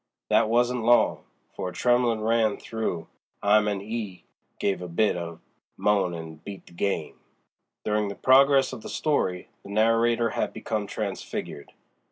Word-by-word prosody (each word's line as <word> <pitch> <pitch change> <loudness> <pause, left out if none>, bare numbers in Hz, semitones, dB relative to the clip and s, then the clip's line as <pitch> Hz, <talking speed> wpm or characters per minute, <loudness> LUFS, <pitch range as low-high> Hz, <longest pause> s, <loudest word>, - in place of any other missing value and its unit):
That 110 - +4
wasn't 120 +1 +2
long, 120 +1 +3 0.3
for 90 - -3
a - - -10
tremblin' 120 -2 +2
ran 110 -1 +2
through 110 -7 -3 0.4
'im 105 +1 +4
and 100 -2 -2
'e 105 -5 -5 0.3
gave 100 -2 -1
a 90 - -5
bit 105 +5 +1
of 85 -1 -5
a - - -23 0.4
moan 100 -4 +2
an' 80 -1 -9
beat 100 -2 -9
the - - -17
game." 100 +3 -2 0.7
During 105 0 +1
the 100 - -5
progress 135 +1 +5
of 110 - -7
the - - -8
story 95 - -1
the - - -13
narrator 115 +2 +2
had - - -2
become - - -3
transfigured. 70 - -5
105 Hz, 160 wpm, -26 LUFS, 95-115 Hz, 0.7 s, progress